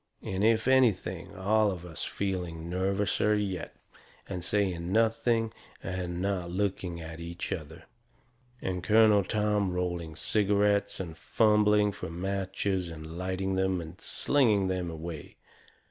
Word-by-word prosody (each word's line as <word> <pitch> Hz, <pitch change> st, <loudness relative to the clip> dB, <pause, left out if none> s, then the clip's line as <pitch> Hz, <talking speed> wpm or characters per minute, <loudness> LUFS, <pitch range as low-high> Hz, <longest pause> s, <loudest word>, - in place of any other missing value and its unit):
And, 95 Hz, +1 st, -2 dB
if 110 Hz, +1 st, +3 dB
anything, 95 Hz, -8 st, +2 dB
all 105 Hz, +3 st, +3 dB
of 90 Hz, -3 st, -5 dB
us 80 Hz, -3 st, -6 dB
feeling 90 Hz, -4 st, -3 dB
nervouser 95 Hz, +3 st, +1 dB
yet. 95 Hz, -4 st, -3 dB, 0.5 s
And 90 Hz, -3 st, -5 dB
saying 90 Hz, -3 st, 0 dB
nothing 115 Hz, +1 st, +2 dB, 0.3 s
and 90 Hz, -2 st, -3 dB
not 95 Hz, -2 st, -1 dB
looking 90 Hz, -2 st, -2 dB
at 80 Hz, 0 st, -8 dB
each 85 Hz, +1 st, -6 dB
other. 80 Hz, 0 st, -5 dB, 0.8 s
And 90 Hz, -1 st, -2 dB
Colonel 105 Hz, 0 st, +5 dB
Tom 105 Hz, -1 st, +1 dB
rolling 85 Hz, -3 st, -2 dB
cigarettes 100 Hz, +3 st, +1 dB
and 85 Hz, -4 st, -5 dB
fumbling 105 Hz, 0 st, +3 dB
fur -, -, -6 dB
matches 95 Hz, +1 st, -2 dB
and 80 Hz, 0 st, -8 dB
lighting 95 Hz, +1 st, -2 dB
them 95 Hz, -1 st, +1 dB
and 85 Hz, +2 st, -9 dB
slinging 110 Hz, -9 st, +2 dB
them 90 Hz, -2 st, -1 dB
away. 80 Hz, -2 st, -7 dB
95 Hz, 130 wpm, -29 LUFS, 85-105 Hz, 0.8 s, Colonel